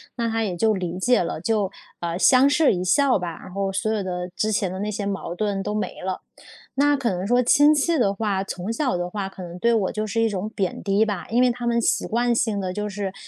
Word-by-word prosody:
那 235 Hz, -2 st, -1 dB
她 225 Hz, 0 st, -1 dB
也 190 Hz, -5 st, -2 dB
就 220 Hz, +4 st, +3 dB
理 180 Hz, -3 st, -3 dB
解 245 Hz, +6 st, +3 dB
了。 170 Hz, -, -3 dB
就， 205 Hz, -1 st, 0 dB, 0.3 s
呃， 170 Hz, 0 st, -3 dB
相 260 Hz, +6 st, +6 dB
视 295 Hz, -2 st, +4 dB
一 180 Hz, -1 st, -2 dB
笑 260 Hz, +9 st, +3 dB
吧， 170 Hz, -2 st, -5 dB
然 -, -, -11 dB
后 195 Hz, 0 st, -1 dB
所 205 Hz, +3 st, -1 dB
有 215 Hz, -, -1 dB
的 180 Hz, -1 st, -3 dB
之 215 Hz, +3 st, 0 dB
前 195 Hz, -3 st, 0 dB
的 185 Hz, -, -5 dB
那 205 Hz, +2 st, -2 dB
些 205 Hz, -1 st, -3 dB
矛 195 Hz, -3 st, -3 dB
盾 200 Hz, 0 st, -1 dB
都 210 Hz, -, -3 dB
没 210 Hz, -, -3 dB
了。 185 Hz, 0 st, -3 dB, 0.5 s
那 290 Hz, +2 st, +3 dB
可 265 Hz, -5 st, 0 dB
能 185 Hz, +1 st, -3 dB
说 245 Hz, +2 st, +3 dB
亲 290 Hz, +5 st, +5 dB
戚 315 Hz, +2 st, +1 dB
的 200 Hz, -5 st, +3 dB
话， 200 Hz, -2 st, -1 dB
从 190 Hz, +2 st, -4 dB
小 260 Hz, -2 st, 0 dB
的 175 Hz, 0 st, -2 dB
话 200 Hz, 0 st, -3 dB
可 190 Hz, -1 st, -10 dB
能 175 Hz, 0 st, -8 dB
对 235 Hz, +5 st, +3 dB
我 210 Hz, -5 st, +1 dB
就 215 Hz, 0 st, -3 dB
是 225 Hz, +2 st, 0 dB
一 225 Hz, -, +3 dB
种 205 Hz, 0 st, -3 dB
贬 190 Hz, -4 st, -2 dB
低 200 Hz, +2 st, +2 dB
吧， 205 Hz, -5 st, -4 dB
因 235 Hz, +2 st, +2 dB
为 250 Hz, -, +4 dB
他 240 Hz, 0 st, -4 dB
们 235 Hz, 0 st, +2 dB
习 -, -, +1 dB
惯 240 Hz, +1 st, +1 dB
性 225 Hz, -3 st, 0 dB
地 185 Hz, -1 st, -3 dB
就 210 Hz, +2 st, -3 dB
是， 200 Hz, -1 st, -4 dB
210 Hz, 280 characters per minute, -23 LUFS, 190-235 Hz, 0.5 s, 相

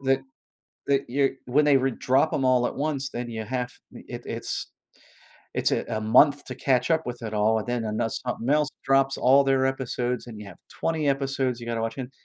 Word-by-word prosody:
that 135 Hz, -1 st, +2 dB, 0.7 s
that 140 Hz, -1 st, +2 dB
you're 135 Hz, +2 st, +2 dB, 0.2 s
when 145 Hz, +4 st, +3 dB
they 145 Hz, -2 st, +5 dB
wou 135 Hz, 0 st, +2 dB
drop 130 Hz, +5 st, +1 dB
'em 135 Hz, -, 0 dB
all 125 Hz, -1 st, +3 dB
at -, -, -4 dB
once, 140 Hz, -2 st, -2 dB
then 120 Hz, 0 st, -5 dB
ya 110 Hz, -1 st, -4 dB
have 125 Hz, +2 st, -3 dB, 0.2 s
it -, -, -9 dB
it's -, -, -4 dB, 0.8 s
it's -, -, +1 dB
a -, -, 0 dB
a 110 Hz, -, -2 dB
month 140 Hz, +7 st, +4 dB
to -, -, -7 dB
catch 125 Hz, -1 st, +1 dB
up 160 Hz, -1 st, +3 dB
with 125 Hz, -1 st, -6 dB
it 110 Hz, -1 st, -5 dB
all, 110 Hz, +1 st, +3 dB
and 110 Hz, -, -5 dB
then 120 Hz, -1 st, -1 dB
an 110 Hz, 0 st, -3 dB
something 125 Hz, -1 st, -4 dB
else 150 Hz, 0 st, +3 dB, 0.2 s
drops 135 Hz, 0 st, +3 dB
all 135 Hz, +2 st, +5 dB
their 135 Hz, -1 st, +3 dB
episodes, 125 Hz, -2 st, -2 dB
and 110 Hz, -3 st, -9 dB
you 105 Hz, -, -9 dB
have 100 Hz, -, -12 dB, 0.2 s
20 160 Hz, -3 st, 0 dB
episodes 135 Hz, -3 st, 0 dB
you 120 Hz, -, -8 dB
gotta 115 Hz, -1 st, -2 dB
watch 115 Hz, 0 st, -2 dB
again- 130 Hz, 0 st, -6 dB
130 Hz, 215 wpm, -25 LUFS, 120-135 Hz, 0.8 s, they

